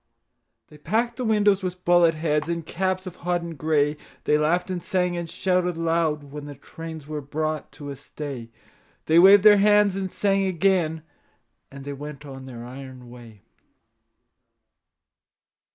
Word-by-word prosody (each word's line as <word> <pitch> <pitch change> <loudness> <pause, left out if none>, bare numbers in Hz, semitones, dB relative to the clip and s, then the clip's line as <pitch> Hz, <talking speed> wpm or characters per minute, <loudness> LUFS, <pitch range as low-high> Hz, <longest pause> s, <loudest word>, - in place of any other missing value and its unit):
They 150 - -16
packed 230 +9 -1
the 255 - -3
windows 210 -3 +3
with 180 -1 -5
bullet 175 -2 +5
heads 150 0 -1
And 170 -2 -3
caps 185 +1 -2
of 180 -1 -8
hodden 175 -1 -2
gray; 150 0 +1 0.3
They 150 - +2
laughed 165 +5 +1
and 180 -1 -3
sang 180 -1 0
and 170 -1 -4
shouted 180 -2 0
loud 165 -2 0
When 145 +1 -9
the 145 - -8
trains 160 +2 -9
were 150 0 -5
brought 155 +2 -3
to 145 -2 -9
a - - -6
stay; 135 -4 -8 0.6
They 160 +2 +5
waved 195 +2 +8
their 210 -1 +8
hands 205 -1 +4
and 190 -1 -3
sang 195 -1 +1
again 170 -3 +1 0.7
As 140 0 -10
they 140 +1 -5
went 145 +1 -8
on 135 -1 -9
their 120 -2 -8
iron 130 -1 -10
way. 115 -4 -14
165 Hz, 155 wpm, -24 LUFS, 145-185 Hz, 0.7 s, waved